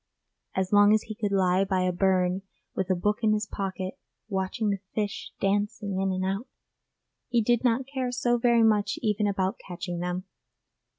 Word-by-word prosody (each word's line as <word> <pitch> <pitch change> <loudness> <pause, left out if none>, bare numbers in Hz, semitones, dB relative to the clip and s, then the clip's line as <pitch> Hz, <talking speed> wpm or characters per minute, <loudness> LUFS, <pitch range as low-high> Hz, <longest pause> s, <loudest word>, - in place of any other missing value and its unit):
As 190 +1 -1
long 205 +1 +7
as 220 - 0
he 220 - -6
could 210 -2 -2
lie 190 -1 +3
by 190 -1 0
a 185 - +2
burn 185 0 +2 0.3
with 190 0 -2
a 185 - +3
book 210 +4 0
in 215 -2 +3
his 210 0 0
pocket, 190 -2 -4 0.3
watching 195 +2 -1
the 200 - -2 0.2
fish 210 -2 -2
dancing 200 -1 0
in 195 0 +1
and 185 0 -1
out, 195 +6 -2 0.8
he 240 -1 +3
did 240 +2 +2
not 250 +1 +2
care 260 -2 -3
so 240 -1 +1
very 235 -1 +4
much 210 -2 +2
even 210 -1 +1
about 195 +1 -1
catching 175 -1 -5
them. 180 +1 -2
200 Hz, 180 wpm, -27 LUFS, 190-220 Hz, 0.8 s, long